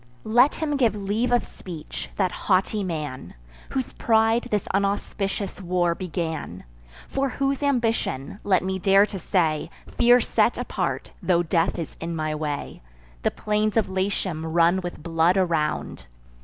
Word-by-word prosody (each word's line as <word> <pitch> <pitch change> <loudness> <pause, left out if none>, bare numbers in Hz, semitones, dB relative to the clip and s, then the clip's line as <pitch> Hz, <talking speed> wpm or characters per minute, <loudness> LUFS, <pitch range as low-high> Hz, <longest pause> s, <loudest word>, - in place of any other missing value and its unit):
Let 240 +6 +4
him 300 -3 -1
give 235 -6 +3
leave 210 +4 -1
of 245 -1 +3
speech, 165 -5 -8
that 185 -3 +1
haughty 200 +3 +1
man, 150 -7 -5 0.3
Whose 260 -2 -3
pride 225 +1 +2
this 210 -4 0
unauspicious 200 0 -1
war 175 -1 +1
began; 160 - -4 0.4
For 275 0 -1
whose 275 +1 -1
ambition 225 - 0
(let 190 -3 +3
me 190 0 -2
dare 195 +2 +5
to 200 -2 -7
say, 160 -4 0 0.3
Fear 245 +1 +7
set - - +2
apart, - - -3
tho' 175 -2 +2
death 165 0 +1
is 165 -3 -6
in 165 0 -3
my 155 -1 -1
way) 150 -1 -4 0.4
The - - +2
plains 210 +1 0
of 215 -4 +2
Latium 190 -3 -1
run 170 +3 +3
with 175 -4 -7
blood 165 +2 +2
around. 165 - -1
190 Hz, 145 wpm, -24 LUFS, 165-220 Hz, 0.4 s, Fear